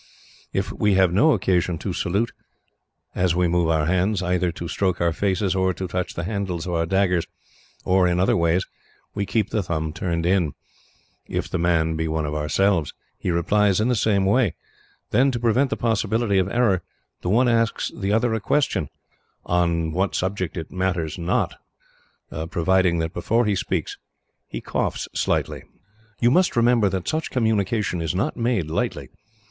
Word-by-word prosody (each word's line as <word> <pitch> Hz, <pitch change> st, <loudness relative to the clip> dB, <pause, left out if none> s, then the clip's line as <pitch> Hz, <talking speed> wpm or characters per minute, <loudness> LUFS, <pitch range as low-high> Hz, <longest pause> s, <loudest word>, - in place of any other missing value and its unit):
If -, -, -2 dB
we 105 Hz, -2 st, +1 dB
have 95 Hz, -2 st, +4 dB
no 150 Hz, -, +5 dB
occasion 90 Hz, -5 st, +1 dB
to -, -, -4 dB
salute, 100 Hz, +7 st, -1 dB, 0.8 s
as 90 Hz, -2 st, +1 dB
we 90 Hz, 0 st, +2 dB
move 85 Hz, -1 st, +1 dB
our 80 Hz, -2 st, +2 dB
hands, 95 Hz, +3 st, +1 dB
either 90 Hz, -1 st, +1 dB
to 85 Hz, -, -6 dB
stroke 95 Hz, +1 st, -1 dB
our 85 Hz, -1 st, +1 dB
faces, 95 Hz, +1 st, 0 dB
or 95 Hz, -1 st, +1 dB
to 95 Hz, -, -4 dB
touch 90 Hz, 0 st, -3 dB
the 85 Hz, -, -3 dB
handles 95 Hz, -4 st, -3 dB
of 90 Hz, -, -3 dB
our 85 Hz, -1 st, 0 dB
daggers, 90 Hz, -2 st, +1 dB, 0.6 s
or 95 Hz, 0 st, +3 dB
in 90 Hz, 0 st, +1 dB
other 100 Hz, +6 st, +3 dB
way, 85 Hz, -1 st, +2 dB, 0.5 s
we 100 Hz, -1 st, -2 dB
keep 110 Hz, -3 st, 0 dB
the 110 Hz, -, +1 dB
thumb 80 Hz, -4 st, -3 dB
turned 85 Hz, 0 st, -2 dB
in. 90 Hz, -5 st, +2 dB, 0.7 s
If -, -, -3 dB
the -, -, -1 dB
man 80 Hz, -1 st, +1 dB
be 80 Hz, 0 st, -1 dB
one 80 Hz, -1 st, -1 dB
of 75 Hz, -, -3 dB
ourselves, 80 Hz, +3 st, +1 dB, 0.2 s
he -, -, -2 dB
replies 95 Hz, +3 st, +2 dB
in 110 Hz, +3 st, +1 dB
the 125 Hz, -, +2 dB
same 100 Hz, -3 st, +2 dB
way. 105 Hz, -2 st, +2 dB, 0.6 s
Then, 135 Hz, +3 st, +4 dB
to 125 Hz, -3 st, -2 dB
prevent 120 Hz, +4 st, +2 dB
the -, -, -2 dB
possibility 110 Hz, -2 st, +1 dB
of 95 Hz, +1 st, 0 dB
error, 105 Hz, -6 st, +2 dB, 0.4 s
the 90 Hz, -, -2 dB
one 120 Hz, +6 st, +4 dB
asks 115 Hz, -1 st, +1 dB
the 100 Hz, -2 st, -2 dB
other 115 Hz, +2 st, +2 dB
a 110 Hz, -, 0 dB
question 110 Hz, -, 0 dB, 0.6 s
on 85 Hz, -2 st, +1 dB
what 95 Hz, +4 st, -1 dB
subject 95 Hz, -1 st, -2 dB
it 80 Hz, -, -6 dB
matters 90 Hz, -3 st, -2 dB
not, 85 Hz, +1 st, -1 dB, 0.9 s
providing 90 Hz, 0 st, +2 dB
that 80 Hz, +1 st, -2 dB
before 115 Hz, +4 st, +1 dB
he 105 Hz, -, +1 dB
speaks, 95 Hz, -, -2 dB, 0.5 s
he -, -, -6 dB
coughs -, -, -2 dB
slightly. -, -, -1 dB, 0.6 s
"You 120 Hz, 0 st, +4 dB
must 180 Hz, +6 st, +3 dB
remember 115 Hz, -3 st, +4 dB
that 95 Hz, -2 st, -3 dB
such 160 Hz, +1 st, -1 dB
communication 105 Hz, -5 st, 0 dB
is 80 Hz, 0 st, -2 dB
not 125 Hz, +11 st, -1 dB
made 115 Hz, -7 st, 0 dB
lightly. 80 Hz, -, -2 dB
95 Hz, 175 wpm, -23 LUFS, 85-110 Hz, 0.9 s, no